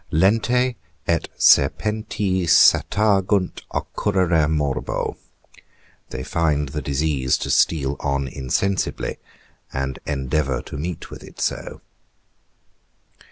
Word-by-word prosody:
LENTE 115 +8 +2 0.3
ET 85 -1 0
SERPENTI 100 +3 +2
SATAGUNT 100 +3 +3
OCCURRERE 90 -6 0
MORBO. 75 -3 -1 0.9
_They 65 0 -6
find 75 -4 0
the 75 +2 -4
disease 70 -2 0
to - - -3
steal 70 -3 +2
on 70 -1 -1
insensibly, 70 +9 -2 0.5
and 65 0 -3
endeavour 70 -1 -1
to - - -9
meet 85 +3 -5
with - - -10
it - - -14
so. - - -3
80 Hz, 95 wpm, -22 LUFS, 70-95 Hz, 0.9 s, SATAGUNT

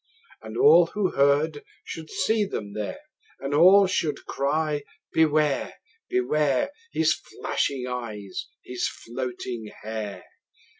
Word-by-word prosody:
And - - -7
all 435 +4 +7
who 205 -3 -1
heard 145 +2 +2 0.2
should 160 -1 -7
see 220 -1 +1
them 105 - -4
there, 105 - -4 0.4
And 135 +1 -3
all 185 +6 +7
should 165 -6 -1
cry, 150 +2 0 0.3
Beware! 155 -3 +2 0.3
Beware! 150 - +1 0.2
His - - +3
flashing 130 -3 -2
eyes, 110 -6 -5 0.2
his 125 -1 -2
floating 120 -2 -5
hair! 110 -2 -5
145 Hz, 110 wpm, -26 LUFS, 125-160 Hz, 0.4 s, all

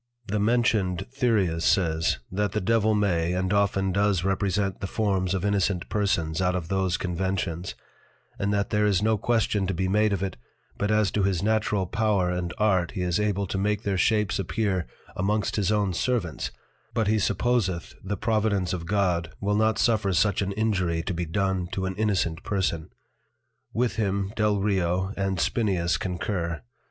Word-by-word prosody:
The 105 0 -1
mentioned 105 -5 +1
Thyreus 105 -11 +1
says, 80 -2 +2
that 100 +1 -1
the - - +1
Devil 110 +1 +2
may, 90 -5 +1
and 95 +1 0
often 95 -1 +2
does 100 -1 +1
represent 95 0 0
the 100 - -2
forms 95 -3 0
of 95 +1 -2
Innocent 100 -3 0
Persons 90 -6 0
out 90 0 +1
of 85 -2 -4
those 95 -2 +1
Conventions, 90 -1 -2 0.6
and 100 +1 0
that 100 -1 0
there 105 0 +3
is 100 -1 +2
no 110 0 +3
Question 110 -4 +1
to 95 - -1
be 95 +2 0
made 105 +2 +2
of 100 -1 -1
it, 95 - -3 0.4
but 105 - -1
as 105 -2 +2
to 105 - 0
his 95 -2 +1
natural 105 -2 +1
Power 100 -2 +1
and 90 -1 -2
Art 95 -5 +2
he 90 - -2
is 90 0 0
able 100 -1 0
to 95 +1 -3
make 105 +1 0
their 100 -1 0
shapes 105 +1 +2
appear 95 -2 -1 0.3
amongst 105 +3 0
his 105 -1 +1
own 100 -3 +1
Servants, 90 - -1 0.5
but 110 - +2
he 110 +1 +2
supposeth 105 -6 0
the 100 +1 -3
Providence 105 -5 0
of 85 -2 -4
God 90 -4 +1
will 100 +1 0
not 110 +1 +2
suffer 105 -5 +2
such 95 +4 +2
an 100 0 -1
Injury 90 -6 0
to 95 - -2
be 85 0 -2
done 95 +1 -1
to 95 0 -1
an 95 - -2
Innocent 95 -5 0
Person. 90 -5 -1 0.8
With 120 0 0
him 100 -1 -1
Delrio, 95 -3 +1
and 95 -1 -1
Spineus 95 -7 +1
concur. 85 - -3
95 Hz, 175 wpm, -26 LUFS, 90-105 Hz, 0.8 s, there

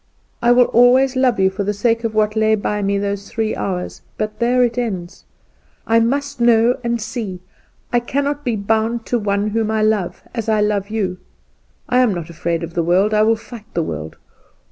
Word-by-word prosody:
I 240 - +4
will 245 0 +6
always 250 +3 +4
love 255 -4 +2
you 190 0 +3
for 195 +1 -3
the 205 +1 -2
sake 230 +3 +1
of 225 -1 -2
what 215 0 +1
lay 220 0 +3
by 210 0 -2
me 200 0 0
those 200 0 -3
three 220 -1 -2
hours; 180 -2 -4 0.2
but 215 0 -4
there 245 +1 +3
it 240 -1 0
ends. 190 -7 -5 0.6
I 230 0 +3
must 280 +3 -1
know 235 +1 +4
and 235 0 -1
see, 215 -4 -5 0.5
I 240 - +4
cannot 285 +4 -2
be 240 -4 0
bound 220 +3 -1
to 240 - 0
one 205 0 0
whom 220 0 -1
I 220 -1 +1
love 215 -5 0
as 230 -2 -3
I 215 -1 +2
love 210 -1 0
you. 195 -4 -2 0.7
I 250 - +2
am 240 -6 +3
not 170 -1 -6
afraid 170 0 -2
of 165 0 -6
the 175 - 0
world 185 +6 +2
I 210 - +4
will 225 +1 +4
fight 225 0 -12
the 170 - +1
world. 80 - -6
220 Hz, 205 wpm, -19 LUFS, 200-235 Hz, 0.7 s, will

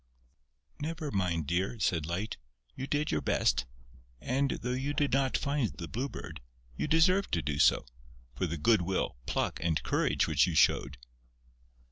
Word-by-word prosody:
"Never 155 -1 -4
mind, 90 -5 0
dear," 90 - -1
said 80 -6 0
Light. 95 +6 -3 0.4
"You 135 - -5
did 150 +1 0
your - - 0
best. - - +1 0.5
And, 135 - 0
though 125 0 -3
you 135 +3 -2
did 145 -3 +1
not 135 -1 +2
find 140 -5 0
the 85 -3 -7
Blue 130 +9 -3
Bird, - - -8 0.3
you - - -2
deserved 175 +5 +3
to 80 - +1
do 70 -1 -2
so, 75 - +4 0.5
for 65 +8 -1
the 85 +1 -3
good 110 +6 +4
will, 90 -8 -1
pluck - - -1
and 80 -2 0
courage - - +1
which 80 +2 +3
you 85 - -2
showed." 70 -2 +3
100 Hz, 165 wpm, -30 LUFS, -, 0.5 s, so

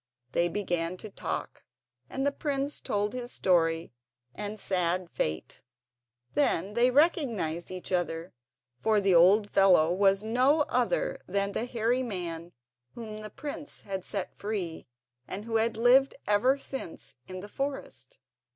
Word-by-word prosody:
They 170 +4 +2
began 175 -2 -1
to 215 +2 -9
talk, - - -5 0.5
and 270 +1 -2
the 285 - +3
prince 280 0 -2
told 205 0 -1
his 250 -1 -5
story 165 -5 +1 0.4
and 210 +1 -5
sad 180 -2 0
fate. 80 0 -3 0.7
Then 205 - +1
they 240 +2 +4
recognised 245 - +1
each 185 0 -7
other, 175 -1 -1 0.5
for 220 +4 +3
the 195 -2 +3
old 190 +5 +6
fellow 180 -5 +5
was 195 +1 +3
no 255 +7 +3
other 250 -4 0
than 200 +1 0
the 225 - -2
hairy 240 +1 +1
man 175 -7 -4 0.4
whom 215 -2 -7
the 215 - -6
prince 290 +5 -7
had 190 -2 -5
set 195 -1 -3
free, 195 -8 -4 0.4
and 200 +3 -5
who 225 -1 0
had 225 0 +1
lived 255 +4 +5
ever 240 +7 +4
since 270 -10 -6
in 185 0 -7
the 205 - -8
forest. 275 - -5
205 Hz, 140 wpm, -29 LUFS, 180-245 Hz, 0.7 s, old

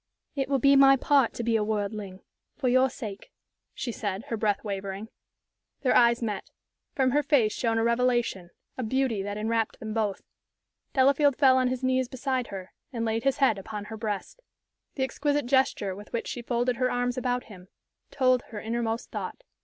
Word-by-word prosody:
"It 270 -1 -1
will 275 - +3
be 275 +2 +5
my 275 0 +7
part 270 -2 +3
to 235 - -3
be 230 0 +1
a 215 - +2
worldling 205 -2 -3 0.4
for 260 - -1
your 255 +1 +4
sake," 210 -6 -8 0.4
she 245 - -3
said, 205 -3 -4
her 230 - -1
breath 210 -2 0
wavering. 200 +1 -5 0.7
Their 260 - +2
eyes 235 0 +5
met. 210 -4 -3 0.5
From 260 -2 +2
her 295 +3 +3
face 270 -7 +3
shone 230 -2 0
a 225 - +2
revelation, 235 -6 +1 0.3
a - - 0
beauty 255 -2 0
that 205 +1 -4
enwrapped 225 +1 -1
them 215 -1 -5
both. 215 -3 -1 0.7
Delafield 280 +1 +4
fell 265 -2 +5
on 255 -1 +3
his 255 +1 -3
knees 260 0 +2
beside 260 -1 -2
her, 190 -2 -8 0.2
and 230 -3 -2
laid 225 +2 -1
his 275 0 +2
head 260 -8 +3
upon 210 +1 -6
her 220 +1 -7
breast. 210 - -4 0.5
The 265 - 0
exquisite 290 +1 0
gesture 245 -7 +1
with 205 +2 -11
which 235 - -2
she 245 - -4
folded 240 +1 0
her 255 0 +1
arms 245 0 -1
about 250 -1 -1
him 185 -4 -13 0.4
told 255 -2 +2
her 215 - -6
inmost 230 +1 -3
thought. - - -6
235 Hz, 185 wpm, -27 LUFS, 215-260 Hz, 0.7 s, my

